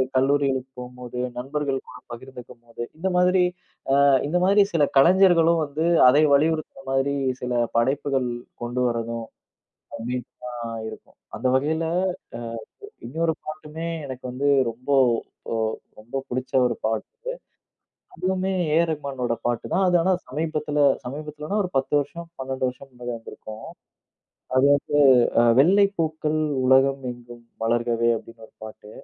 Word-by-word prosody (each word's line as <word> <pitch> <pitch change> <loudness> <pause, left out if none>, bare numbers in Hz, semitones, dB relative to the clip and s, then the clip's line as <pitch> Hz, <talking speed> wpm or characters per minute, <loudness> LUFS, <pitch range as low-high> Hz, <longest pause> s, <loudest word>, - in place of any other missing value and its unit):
கல்லூரிகளுக்கு 135 -1 +1
போம்போது, 125 0 -8 0.2
நண்பர்கள் 135 +1 -2
கூட - - -11
பகிர்ந்துக்கும் 125 0 -11
போது, 120 0 -9 0.2
இந்த 175 +4 -2
மாதிரி, 180 +1 +4 0.6
அ - - +6 0.2
இந்த 175 +4 +1
மாதிரி 200 +2 +5
சில 155 -3 +3
கலைஞர்களும் 170 +1 +5
வந்து, 150 +2 -3 0.3
அதை 145 +4 +5
வலியுறுத்துற 155 -1 +1
மாதிரி 135 +1 +1 0.3
சில 125 0 -2 0.2
படைப்புகள் 135 +1 +1 0.3
கொண்டு 120 +1 -3
வர்றதும், 115 -1 -3 0.7
கண்டிப்பா 125 +1 -6 0.4
இருக்கும். - - -12 0.2
அந்த 125 - -3
வகையில, 155 +4 0 0.9
அ - - -68
இ - - -15 0.2
இன்னொரு 160 +3 0
பாட்டுமே, 155 +2 -6 0.2
எனக்கு 130 -1 -8
வந்து 140 +3 0 0.2
ரொம்போ 130 +5 -2 0.6
ஒ - - 0 0.5
ரொம்ப 120 +5 -5
பிடிச்ச 130 +1 -4
ஒரு 120 - -1
பாட்டு, 470 - -4 0.8
அதுவுமே 190 - -1 0.2
ஏஆர் 165 +1 +3
ரகுமானோட 135 -6 -2
பாட்டு 120 -2 -1
தான். 190 - +3
அது 180 - +4
ஆனா 190 - +2 0.2
சமீபத்தில, 150 +1 -3 0.3
சமீபத்துலனா 150 +8 -4
ஒரு 180 - -4
10 135 - -2
வருஷம் 170 +4 -7
12 130 0 -2
வருஷம் 130 +2 -10
முன்னாடி 120 0 -6
வந்திருக்கும். 110 -1 -10 0.9
அது 130 - +5
வந்து 145 +1 -2 0.4
அ, - - +6 0.2
"வெள்ளைப்பூக்கள் 160 -3 +2 0.3
உலகம் 135 +1 +4
எங்கும் 120 -1 -14 0.2
வளர்கவே" 115 0 +1
அப்டின்னு 115 0 -14
ஒரு - - -32
பாட்டு. 110 -1 -11
135 Hz, 130 wpm, -24 LUFS, 125-160 Hz, 0.9 s, அ